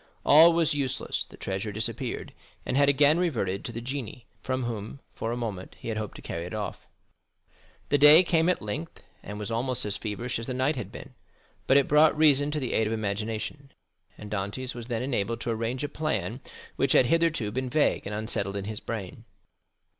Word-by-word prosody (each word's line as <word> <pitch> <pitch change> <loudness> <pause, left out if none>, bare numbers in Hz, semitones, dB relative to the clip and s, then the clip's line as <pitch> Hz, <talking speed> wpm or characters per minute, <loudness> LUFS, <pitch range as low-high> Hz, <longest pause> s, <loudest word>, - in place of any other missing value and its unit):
All 160 +3 +8
was 165 -1 +2
useless, 140 -3 -1
the - - -15
treasure 95 +2 -3
disappeared, 115 +4 -4 0.3
and - - -2
had 140 +1 +5
again 145 +3 +4
reverted 110 - -1
to - - -4
the 115 0 -6
genii 125 -2 -6 0.2
from 130 -1 -2
whom 115 +2 -5
for 115 - -3
a 120 - -2
moment 105 -6 -5
he - - -7
had 110 - -2
hoped 105 -2 -5
to - - -11
carry 85 - -4
it 90 - -6
off. 105 -1 -5 1.0
The 145 - +3
day 150 +5 +9
came 165 -1 +2
at 180 - 0
length, 145 +11 -6 0.2
and 105 - -7
was 105 +1 -5
almost 125 +1 +3
as 105 - -2
feverish 115 +3 -4
as 115 - -6
the 130 - -3
night 135 +4 +1
had 125 - -6
been, - - -10 0.5
but 135 - +6
it 140 - +3
brought 150 +1 +5
reason 145 -2 +4
to 150 0 -2
the 130 -4 -3
aid 110 - +2
of 110 - -1
imagination, 110 +6 -4 0.4
and 105 0 -10
Dantès 105 +6 -3
was 120 -1 -8
then 120 -1 -2
enabled 115 -4 -1
to 120 - -1
arrange 115 +4 -2
a - - 0
plan 150 -5 -3 0.4
which 135 - +2
had 130 - +6
hitherto 165 -7 +1
been 130 +3 -3
vague 145 -6 +1
and 105 - -4
unsettled 105 -2 -2
in 100 - -4
his 110 0 -4
brain. 105 -6 -6
120 Hz, 205 wpm, -27 LUFS, 110-145 Hz, 1.0 s, day